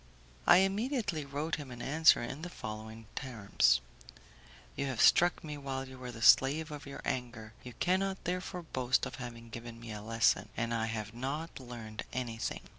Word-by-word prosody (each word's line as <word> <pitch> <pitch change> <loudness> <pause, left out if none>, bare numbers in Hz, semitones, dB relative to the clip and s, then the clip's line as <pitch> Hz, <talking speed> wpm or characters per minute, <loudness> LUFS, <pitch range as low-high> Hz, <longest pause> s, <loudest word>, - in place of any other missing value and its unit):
I 175 - +9
immediately 195 - +1
wrote 145 +4 -2
him 145 -3 -7
an 120 -1 -8
answer 155 +2 +5
in 135 +5 -5
the 180 - -5
following 110 -4 -7
terms: 115 - +2 0.9
"You 140 - -1
have 130 -4 -3
struck 175 +1 +5
me 150 -2 -6
while 135 -1 -4
you 130 0 -11
were 125 -1 -6
the 115 -1 -7
slave 150 +7 +6
of 145 -1 -7
your 140 - -7
anger; 120 -4 -3
you 125 - -8
cannot 190 - 0
therefore 180 0 -3
boast 130 -5 +1
of - - -6
having 115 -2 -8
given 115 0 -8
me 115 -1 -8
a 105 -1 -6
lesson, 115 +2 +2
and 115 +1 -1
I 110 -1 0
have 110 -1 -4
not 140 +8 -4
learned 115 -4 -7
anything. 120 -3 -3
130 Hz, 180 wpm, -32 LUFS, 115-155 Hz, 0.9 s, I